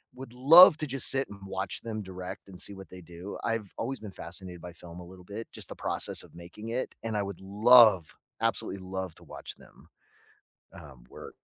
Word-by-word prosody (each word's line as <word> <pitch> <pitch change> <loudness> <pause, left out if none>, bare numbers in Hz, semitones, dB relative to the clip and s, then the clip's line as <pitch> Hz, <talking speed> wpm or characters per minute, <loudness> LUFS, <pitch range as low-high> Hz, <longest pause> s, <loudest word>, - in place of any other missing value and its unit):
would 130 -1 -10
love 155 +7 +9
to 155 - -3
just 135 -2 +3
sit 135 0 +2
and 105 - -11
watch 95 0 -4
them 110 -2 -5
direct, 95 +1 -8
and 95 -2 -10
see 100 - -3
what 95 -1 -12
they 90 0 -11
do. 85 +3 -9
I've 115 -4 -3
always 130 +3 -4
been 105 -2 -9
fascinated 90 0 -6
by 90 0 -9
film 85 0 -12
a 90 - -10
little 90 0 -14
bit, 105 +4 -7
just - - -6
the - - -7
process - - -2
of - - -18
making 85 +6 -10
it, 125 +3 -3
and 110 -1 -2
I 105 - 0
would 100 -2 -7
love, 105 -2 +5 0.3
absolutely 115 -3 -1
love, 95 -2 -5
to - - -16
watch - - -8
them, - - -20 0.8
um, 65 -5 -14
work. - - -11
100 Hz, 210 wpm, -28 LUFS, 90-115 Hz, 0.8 s, love